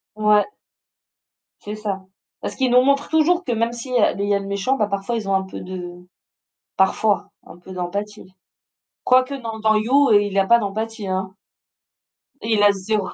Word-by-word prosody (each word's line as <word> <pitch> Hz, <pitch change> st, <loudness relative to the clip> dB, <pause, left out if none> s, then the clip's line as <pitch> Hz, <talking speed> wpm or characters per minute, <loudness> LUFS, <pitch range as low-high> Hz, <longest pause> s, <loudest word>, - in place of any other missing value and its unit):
Ouais. 210 Hz, -1 st, +3 dB, 1.2 s
C'est 210 Hz, +1 st, -6 dB
ça. 200 Hz, -3 st, -4 dB, 0.4 s
Parce -, -, -5 dB
qu'ils 260 Hz, -2 st, 0 dB
nous 250 Hz, 0 st, +6 dB
montrent 280 Hz, +2 st, +1 dB
toujours 335 Hz, +3 st, +2 dB
que 245 Hz, -, -3 dB
même 230 Hz, +1 st, 0 dB
s'il 250 Hz, +2 st, -7 dB
y -, -, +3 dB
a 210 Hz, -, +3 dB
il 200 Hz, 0 st, -3 dB
y -, -, +3 dB
a 200 Hz, -, +2 dB
le 195 Hz, -, -7 dB
méchant, 200 Hz, +7 st, -1 dB
bah, 210 Hz, -4 st, +1 dB
parfois 200 Hz, +4 st, -3 dB
ils 215 Hz, -3 st, -4 dB
ont 195 Hz, -, +2 dB
un 190 Hz, -, +1 dB
peu 190 Hz, -, -8 dB
de 180 Hz, -1 st, -7 dB, 0.8 s
parfois 200 Hz, +1 st, +1 dB, 0.2 s
un -, -, -13 dB
peu 180 Hz, +2 st, -14 dB
d'empathie. 195 Hz, +2 st, -5 dB, 0.7 s
Quoique 255 Hz, +2 st, +3 dB
non, 225 Hz, -4 st, -6 dB
dans 215 Hz, 0 st, +3 dB
You, 260 Hz, +6 st, +3 dB
il 205 Hz, -1 st, +3 dB
a 195 Hz, -, +4 dB
pas 235 Hz, +3 st, +5 dB
d'empathie, 215 Hz, 0 st, -4 dB
hein. 190 Hz, 0 st, -3 dB, 1.1 s
Il 220 Hz, -2 st, +1 dB
a 205 Hz, -, +7 dB
0 200 Hz, 0 st, -2 dB
emp. -, -, -8 dB
210 Hz, 190 wpm, -21 LUFS, 195-235 Hz, 1.2 s, a